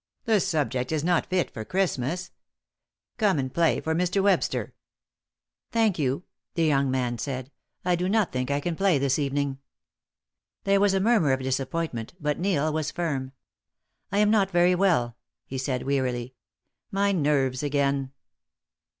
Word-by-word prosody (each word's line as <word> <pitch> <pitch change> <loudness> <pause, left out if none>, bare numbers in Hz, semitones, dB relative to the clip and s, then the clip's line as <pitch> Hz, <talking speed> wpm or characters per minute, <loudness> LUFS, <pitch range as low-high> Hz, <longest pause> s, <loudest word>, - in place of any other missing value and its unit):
The 220 -3 +3
subject 145 - -1
is 155 -2 0
not 175 0 +2
fit 185 -2 0
for 110 - -5
Christmas. 175 - -1 0.9
Come 205 -6 +3
and 130 -2 -2
play 170 -1 +2
for 160 - -1
Mr. 180 +3 +1
Webster." 200 -1 +1 1.0
"Thank 225 -7 +2
you," 135 +3 0 0.3
the 165 -2 +2
young 140 -3 +2
man 125 -2 -1
said. 130 -1 -4 0.3
"I 180 -1 +3
do 180 +2 -1
not 215 -2 +2
think 125 0 -2
I 140 0 0
can 170 +2 -2
play 195 -3 +3
this 135 +1 +1
evening." 140 -1 -1 1.0
There 200 0 +3
was 200 -1 +3
a - - +3
murmur 195 - +3
of 130 - -1
disappointment, 130 0 -3
but 150 -2 -1
Neil 155 -5 +1
was 155 -1 -1
firm. 140 -7 -2 0.8
"I 200 - 0
am 210 0 +4
not 200 -3 +3
very 175 0 +4
well," 165 -11 +2 0.3
he 130 - -5
said, 130 -1 -2
wearily. 130 -2 -1 0.6
"My 200 +1 +1
nerves 140 -7 +1
again." 140 -2 0
150 Hz, 155 wpm, -26 LUFS, 130-185 Hz, 1.0 s, am